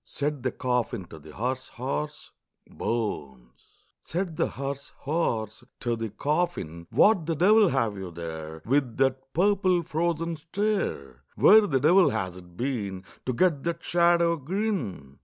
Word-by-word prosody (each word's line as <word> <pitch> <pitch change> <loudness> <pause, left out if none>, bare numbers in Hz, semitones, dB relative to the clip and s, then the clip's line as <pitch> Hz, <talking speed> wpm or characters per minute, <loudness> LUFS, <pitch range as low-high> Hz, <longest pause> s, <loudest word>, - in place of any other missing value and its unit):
Said 145 -1 -3
the 130 0 -1
coffin 125 -5 -1
to 80 - -10
the 75 +1 -13
hearse 130 +4 -2
horse, 145 +4 -4 0.4
"Bones!" 70 - -5 0.2
Said 175 -1 -3
the - - +1
hearse 140 +1 -5
horse 120 -8 -1 0.2
to 120 -1 -1
the 115 -1 -4
coffin, 105 - -2
"What 195 -7 +4
the 165 - 0
devil 205 +4 +5
have 115 -7 0
you 95 -2 -6
there, 80 -2 -7
With 130 -2 +1
that 135 0 0
purple 185 -1 +3
frozen 165 0 -1
stare? 165 - -2
Where 215 0 +7
the 135 -6 +1
devil 175 +7 +5
has 95 -5 -2
it 90 -1 -14
been 105 -8 -3 0.2
To 130 - +1
get 160 +1 +2
that 170 +1 -3
shadow 170 -1 +3
grin?" 150 - -3
135 Hz, 145 wpm, -27 LUFS, 100-170 Hz, 0.4 s, Where